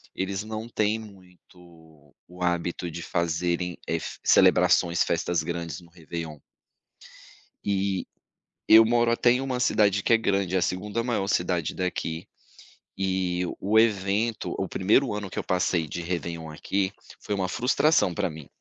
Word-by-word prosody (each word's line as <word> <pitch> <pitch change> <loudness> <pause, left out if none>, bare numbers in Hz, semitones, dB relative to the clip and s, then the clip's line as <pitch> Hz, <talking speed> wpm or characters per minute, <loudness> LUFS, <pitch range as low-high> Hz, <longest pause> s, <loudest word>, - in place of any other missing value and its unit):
eles 95 +1 -2
não 110 +1 -6
têm 110 -2 0
muito 90 -7 -16 0.2
o 90 +1 -8
hábito 85 0 -1
de 85 +1 -7
fazerem, 85 +1 -1
eh, 80 - 0
fe - - -7
celebrações, 85 0 +4
festas 85 -1 0
grandes 85 0 -4
no 85 -1 -18
Réveillon. 80 -2 -7 1.3
Eh, 100 -1 0 0.6
eu 110 +1 +9
moro 120 +1 +3
até 120 +1 +4
em 125 - +1
uma 130 -2 -2
cidade 100 -4 +2
que - - +3
é - - +7
grande, 100 -4 0
é - - +4
a - - -2
segunda 100 +6 -2
maior 115 -5 -1
cidade 90 -4 0
daqui 90 -2 -3 0.7
e 95 -2 0 0.2
o 105 +3 +3
evento 110 +1 +1
o 95 - -2
primeiro 110 +9 +2
ano 105 -2 -5
que - - -6
eu - - -2
passei 90 -2 0
de 75 - -5
Réveillon 85 -2 -4
aqui 95 +5 -1 0.3
foi 105 - -3
uma 95 -2 -1
frustração 125 - +2
pra - - 0
mim. 80 -2 -10
95 Hz, 155 wpm, -26 LUFS, 85-105 Hz, 1.3 s, eu